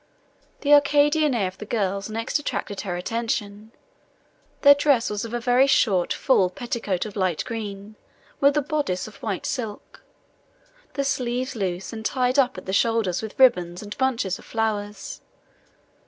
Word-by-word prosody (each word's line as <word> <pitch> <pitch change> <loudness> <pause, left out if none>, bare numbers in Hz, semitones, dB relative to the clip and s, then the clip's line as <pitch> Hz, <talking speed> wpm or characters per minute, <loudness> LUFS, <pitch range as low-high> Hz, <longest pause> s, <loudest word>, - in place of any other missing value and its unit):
The 290 0 +4
Arcadian 290 0 +4
air 200 -5 +1
of 185 - -9
the - - -6
girls 200 -2 -2
next 225 +6 -1
attracted 205 -8 -4
her 185 -4 -4
attention. 215 +1 -3 0.9
Their 285 -1 +10
dress 280 -6 +2
was 205 -1 -3
a 235 +1 -3
very 250 +3 +3
short 195 -9 +2
full 195 -9 +3
petticoat 220 -2 -3
of 210 - -8
light 185 -5 0
green, 210 -2 -6 0.4
with 285 +1 +4
a 295 - +2
boddice 285 -12 -2
of 210 -2 -13
white 200 -4 -3
silk; 225 -6 -5 0.9
the 280 - -1
sleeves 255 -1 -2
loose, 190 -1 -3
and 220 -1 -6
tied 255 +3 +1
up 260 -1 +2
at - - -8
the 190 - -4
shoulders 220 -4 +1
with 220 -2 -7
ribbons 180 -9 +3
and 205 0 -7
bunches 245 -8 0
of - - -15
flowers. 210 -2 -3
225 Hz, 155 wpm, -24 LUFS, 200-260 Hz, 0.9 s, Their